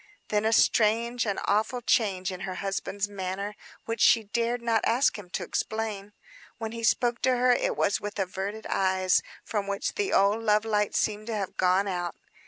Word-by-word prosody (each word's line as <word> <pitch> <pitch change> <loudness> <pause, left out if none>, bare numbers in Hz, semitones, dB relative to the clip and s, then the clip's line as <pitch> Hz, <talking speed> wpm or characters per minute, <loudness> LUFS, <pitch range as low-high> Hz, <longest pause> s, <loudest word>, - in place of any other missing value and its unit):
Then 210 0 +1
a 220 - +3
strange, 230 +2 +3
an 200 - -1
awful 215 +5 +1
change 195 -5 +1
in 185 - -6
her 185 0 -5
husband's 195 +1 -3
manner, 200 +1 -4 0.3
which 230 0 -3
she 225 - +6
dared 235 +3 -1
not 230 -2 +1
ask 245 +5 +2
him 185 -3 -11
to - - -3
explain. 210 -2 -3 0.4
When 225 -2 -5
he 230 0 -6
spoke 240 +1 +2
to 255 -1 +2
her, 250 +1 +4
it 245 - +1
was 200 - +1
with 205 0 -5
averted 195 +3 -3
eyes, 185 -1 +2 0.2
from 205 -2 -3
which 200 0 -2
the 405 -1 -1
old 200 +3 +3
love 215 -1 +2
light 210 -2 0
seemed 215 0 0
to 230 - -2
have 195 -3 -4
gone 185 +2 +2
out. 175 -2 -3
210 Hz, 190 wpm, -27 LUFS, 195-225 Hz, 0.4 s, she